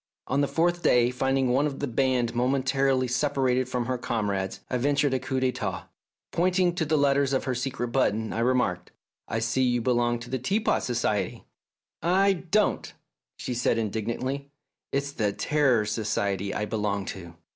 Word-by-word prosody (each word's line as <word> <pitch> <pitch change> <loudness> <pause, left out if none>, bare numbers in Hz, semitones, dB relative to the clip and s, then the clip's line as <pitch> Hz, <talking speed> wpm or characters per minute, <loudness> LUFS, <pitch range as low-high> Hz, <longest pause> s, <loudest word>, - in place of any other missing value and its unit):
On 135 +2 +1
the 140 - +2
fourth 175 +3 +1
day, 120 -4 +4
finding 135 0 +1
one 135 +4 +3
of 140 -2 -5
the - - -1
band 125 -2 +1
momentarily 130 +1 +1
separated 130 -1 +1
from 125 -2 -1
her 125 0 -2
comrades, 100 -5 -2
I 125 - -1
ventured 145 +1 +2
a 130 - +1
coup 130 +1 -2
d'6tat. 130 -1 -2 0.5
Point 180 +2 +1
ing 180 -2 +3
to 170 -2 -1
the 155 +1 +1
letters 140 -1 +2
on - - +1
her 130 - -1
secret 125 0 -3
button, 110 -3 0
I - - -2
remarked, 120 -7 0 0.4
"I 110 - -2
see 115 +3 0
you 125 -1 +2
belong 120 0 +1
to 120 - -9
the 130 - -1
Teapot 205 - +1
Society." 115 -4 -1 0.4
" - - -66 0.2
I 200 0 +5
don't! 190 +4 0 0.2
" - - -64
she 125 - -4
said 120 -1 +1
indignantly; 115 +6 -3 0.2
" - - -62
it's 140 +1 -1
the 105 -7 -1
Terror 130 -4 +2
Society 100 -2 -1
I 105 - -2
belong 105 -3 -2
to." 85 -3 -11
125 Hz, 180 wpm, -26 LUFS, 115-140 Hz, 0.5 s, I